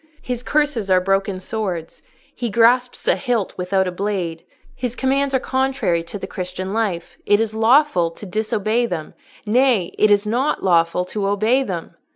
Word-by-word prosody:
His 250 -2 -3
curses 285 -7 0
are 185 -1 +5
broken 195 0 0
swords: 185 -5 -4 0.3
he 240 - -3
grasps 245 +3 +2
a - - +5
hilt 240 -7 -1
without 190 +1 0
a - - -2
blade. 180 -4 -3 0.3
His 250 -2 -4
commands 275 +1 +1
are - - +3
contrary 260 -10 0
to 170 - -7
the - - -6
Christian 185 0 -5
life: 210 -6 -2
it 205 0 +4
is 225 -1 -1
lawful 225 - +3
to 165 +5 -11
disobey 215 +3 0
them—nay, 210 - -1
it 215 - +5
is 205 0 +3
not 250 +7 0
lawful 170 0 +2
to 195 +2 -3
obey 215 +6 +2
them." 175 -10 -5
210 Hz, 165 wpm, -20 LUFS, 185-245 Hz, 0.3 s, are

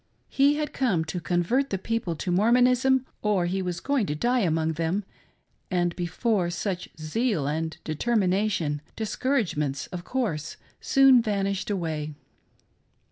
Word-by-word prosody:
He 280 +2 +4
had 300 -1 -3
come 195 -12 +1
to 160 +3 -4
convert 180 - 0
the 195 - -1
people 205 -3 -2
to 180 +4 -3
Mormonism 250 +6 +4 0.2
or 205 -4 +1
he 190 +2 -1
was 180 -2 -3
going 265 -2 0
to 150 - -2
die 245 +10 +1
among 160 -5 +1
them, 165 +6 -1 0.7
and 175 -2 0
before 180 +2 0
such 180 +1 -3
zeal 175 - 0
and 160 +2 -2
determination, 185 -4 0 0.2
discour 255 +5 0
agements, 150 -5 -3
of 180 -1 -5
course, 185 - -2 0.2
soon 270 -3 +5
vanished 200 -3 -1
away. 160 -6 -3
190 Hz, 135 wpm, -26 LUFS, 165-235 Hz, 0.7 s, soon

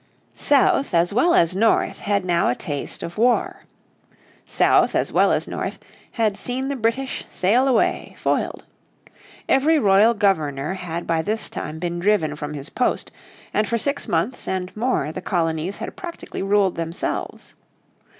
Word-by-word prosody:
South 275 -5 +3
as 170 +3 +2
well 340 +10 +3
as 170 +2 +3
north 220 +3 +2
had 200 -2 0
now 170 -1 +2
had 125 - +1
a - - -18
taste 145 -2 -4
of 170 +4 -6
war. 245 +1 +1 0.8
South - - +3
as - - 0
well - - +4
as - - 0
north - - -4 0.4
had 220 -4 +1
seen 260 +5 -2
the 280 - -2
British 255 +3 -1
sail 235 +9 +2
away, 250 -4 +1
foiled. - - -1 0.8
Every 300 +4 +4
royal 210 -1 +4
governor 155 -7 0
had 170 -2 -5
by 165 -1 +1
this 215 +6 -2
time 155 - -5
been 175 +1 -3
driven 175 -6 +1
from 150 0 -6
his 140 +1 -7
post, 250 - -1 0.4
and 210 0 +1
for 235 - 0
six 280 +5 -1
months 175 +10 -1
and 185 -1 -3
more 215 - 0
the 185 - -6
colonies 170 0 -1
had - - -6
practically 345 -2 -7
ruled 195 -2 +2
themselves. 165 +1 -4
195 Hz, 160 wpm, -22 LUFS, 170-235 Hz, 0.8 s, well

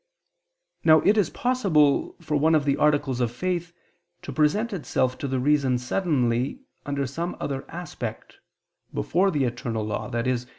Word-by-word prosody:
Now 155 -1 +6
it 205 - +4
is 205 -7 +2
possible 190 - +2
for 155 -2 -2
one 160 +2 +4
of 150 -2 +2
the 140 -1 +2
articles 145 -4 +1
of 120 -2 +1
faith 175 +5 -2 0.5
to - - -6
present 205 +10 +1
itself 130 -7 0
to 140 - -3
the 130 -1 -1
reason 135 -2 +2
suddenly 130 - 0 0.3
under 140 -1 -1
some 165 +7 -4
other 135 -1 -4
aspect, 175 +1 -7 0.5
before 190 +4 +1
the 150 -7 0
eternal 120 -3 -2
law, 105 - -3
i.e. 120 +2 0
145 Hz, 155 wpm, -25 LUFS, 130-170 Hz, 0.5 s, Now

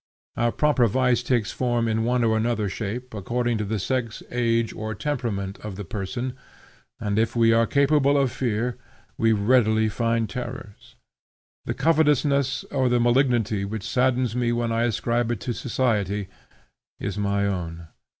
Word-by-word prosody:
Our 120 0 +1
proper 145 -4 +3
vice 125 +1 +2
takes 120 -3 0
form 120 -2 0
in 110 0 0
one 120 +1 +1
or 110 -1 +2
another 110 -1 0
shape, 115 +6 -5
according 120 +3 -1
to 105 - -1
the 110 +2 -2
sex, 115 +2 -2
age, 115 -2 +1
or 110 0 -5
temperament 105 -8 -3
of 105 -3 -7
the 100 +1 -6
person, 120 +7 -4 0.7
and, 105 0 0
if 115 +2 0
we 115 -1 +4
are 115 0 +3
capable 140 0 +3
of 135 -3 +2
fear, 120 0 -2 0.4
will 110 -1 +3
readily 110 0 +3
find 115 +1 0
terrors. 120 -4 -8 0.7
The - - -2
covetousness 145 -4 +2
or 130 -3 +1
the 120 0 +2
malignity 120 -4 +2
which 100 +1 -4
saddens 125 -2 +1
me 120 -1 +1
when 120 -1 -1
I 115 +1 +1
ascribe 120 +1 0
it 110 - -5
to 120 - -2
society, 105 -4 -1 0.7
is 100 0 -3
my 100 0 +1
own. 85 -4 -4
115 Hz, 160 wpm, -24 LUFS, 105-125 Hz, 0.7 s, we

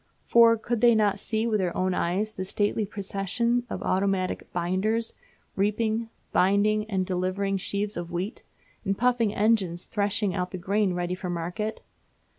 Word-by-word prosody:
For 230 -1 +6
could 235 0 -2
they 235 -1 +6
not 205 -2 +2
see 220 +2 -1
with 220 -3 +1
their 180 -3 -1
own 185 0 +1
eyes 190 +6 0
the 185 - -4
stately 205 +2 0
procession 210 +5 -1
of - - -4
automatic 190 -1 0
"binders" 190 +6 -1 0.4
reaping, 220 +3 0 0.2
binding, 210 +3 +2
and 190 -3 0
delivering 185 +2 -1
sheaves 200 +2 -2
of 175 -1 -4
wheat, 185 +7 -3 0.4
and 195 -1 -1
puffing 240 -3 +2
engines 200 -5 +1
threshing 205 -2 0
out 180 -2 -2
the 185 - -5
grain 195 +1 0
ready 175 0 -1
for 180 0 -5
market? 175 +6 -3
200 Hz, 155 wpm, -27 LUFS, 185-220 Hz, 0.4 s, For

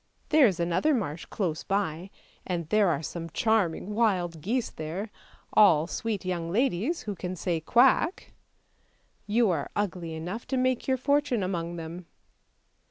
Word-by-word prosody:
There 300 -4 +6
is 185 -4 -1
another 175 - +2
marsh 165 - -3
close 170 -6 -3
by, 190 -3 -2 0.3
and 170 -3 -3
there 210 -1 +4
are 155 -2 -1
some 165 +1 -5
charming 210 -1 0
wild 185 -7 +1
geese 235 - -1
there; 175 +7 -5 0.4
all 165 -8 +6
sweet 205 +2 -3
young 170 -2 -2
ladies, 245 - 0
who 210 - -3
can 185 -1 -5
say 165 +1 -1
quack! 250 - +3 0.9
You 220 -1 +3
are 145 -5 -2
ugly 175 -5 -2
enough 180 +8 -5
to 265 - -1
make 255 -1 0
your 260 -1 +2
fortune 270 -4 +1
among 175 -2 -3
them." 165 +1 -7
185 Hz, 150 wpm, -28 LUFS, 170-230 Hz, 0.9 s, There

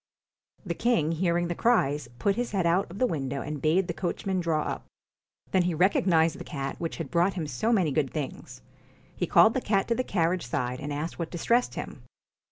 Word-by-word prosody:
The 175 - -2
king 170 -7 +1
hearing 170 +1 +1
the 175 - -1
cries, 150 - +1
put 200 +10 +1
his 240 -2 -3
head 190 -3 +1
out 175 +4 +3
of - - -22
PUSS - - -10
IN - - -9
the 255 - +3
window 140 - -2
and 150 -1 -5
bade 170 +5 +2
the 170 - -2
coachman 185 +2 -2
draw 160 -3 0
up. - - -3
BOOTS - - -39
Then 185 - +4
he 175 -1 0
recognised 170 -2 +3
the - - -6
cat 135 -1 -5
which 165 - -4
had 165 -5 -5
brought 175 +3 +2
him 170 -4 -2
so 150 - -1
many 185 -10 +2
good 140 0 +1
things. 150 -4 -6 0.5
He - - -2
called 220 - +6
the 260 - -1
cat 195 -4 +1
to - - +4
the 255 - -1
carriage 175 - 0
side 125 -1 -2
and 145 - -5
asked 150 +5 -4
what 165 -1 -3
distressed 235 +8 +1
him. - - -6
170 Hz, 225 wpm, -27 LUFS, 150-195 Hz, 0.5 s, called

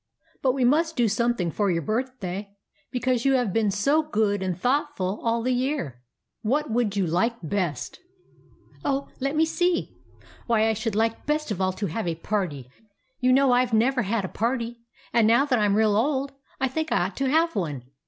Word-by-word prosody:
But 260 -2 +2
we 260 -2 +1
must 320 +5 +2
do 240 -3 +3
something 220 -5 0
for 205 +2 0
your 165 -2 0
birthday, 210 - -3 0.3
because 250 -1 0
you 275 - +3
have 245 -7 +1
been 220 -2 +2
so 275 +11 +2
good 215 -9 0
and 185 -2 -2
thoughtful 245 -6 0
all 230 0 0
the 255 +1 +1
year. 250 - -2 0.4
What 280 +4 0
would 220 -3 0
you 195 - +2
like 180 +9 +1
best? 175 -2 -2 0.3
" - - -30
" - - -27
Oh, 275 0 -1
let 275 +3 -1
me 320 +1 +4
see. 350 +2 0 0.5
Why, 225 -2 +3
I 225 - +2
should 220 0 -3
like 225 +3 0
best 300 -4 0
of 190 -2 -2
all 185 0 +1
to 205 - -3
have 185 +3 -3
a 165 - -1
party. 165 - -3 0.5
You 255 0 +3
know 270 0 +5
I 245 +1 +5
Ve 225 -2 +1
never 250 +3 +2
had 210 -1 -1
a - - -3
party; 235 +2 -2 0.3
and 230 -2 +4
now 235 +5 +5
that 255 -5 +1
I 210 - +3
'm 205 0 +2
real 215 -2 +3
old 270 +4 0 0.3
I 265 - +2
think 315 +5 -3
I 175 - +2
ought 190 - -6
to 270 -1 0
have 330 +3 +2
one. 150 - -2
230 Hz, 210 wpm, -25 LUFS, 200-265 Hz, 0.5 s, know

